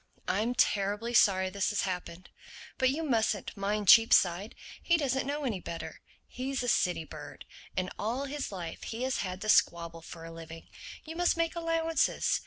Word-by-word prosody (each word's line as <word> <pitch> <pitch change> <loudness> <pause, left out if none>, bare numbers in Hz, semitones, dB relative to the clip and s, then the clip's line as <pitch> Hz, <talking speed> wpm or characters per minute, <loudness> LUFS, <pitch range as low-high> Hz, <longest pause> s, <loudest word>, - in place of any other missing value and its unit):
"I'm 235 +4 0
terribly 205 +3 +1
sorry 190 -4 +4
this 200 +3 0
has 205 - 0
happened. 180 -1 -5 0.5
But 260 - +4
you 305 +5 -2
mustn't 220 -8 0
mind 205 +1 -2
Cheapside; 200 -3 +5 0.3
he 340 - +3
doesn't 265 -3 -1
know 290 +1 -2
any 220 -7 -1
better. 170 -1 -7 0.3
He's 260 0 -3
a - - -3
city 180 -7 +2
bird; 150 -1 -10 0.3
and 185 -1 -1
all 240 +6 -2
his 285 -2 -4
life 175 -4 -6
he 230 +2 -4
has 260 0 0
had 185 0 -4
to 215 - -3
squabble 170 -4 +2
for 165 0 -10
a 165 - -8
living. 165 0 -10 0.4
You 320 +1 -7
must 350 0 +2
make 330 0 0
allowances. 330 -1 +1
215 Hz, 175 wpm, -30 LUFS, 180-265 Hz, 0.5 s, Cheapside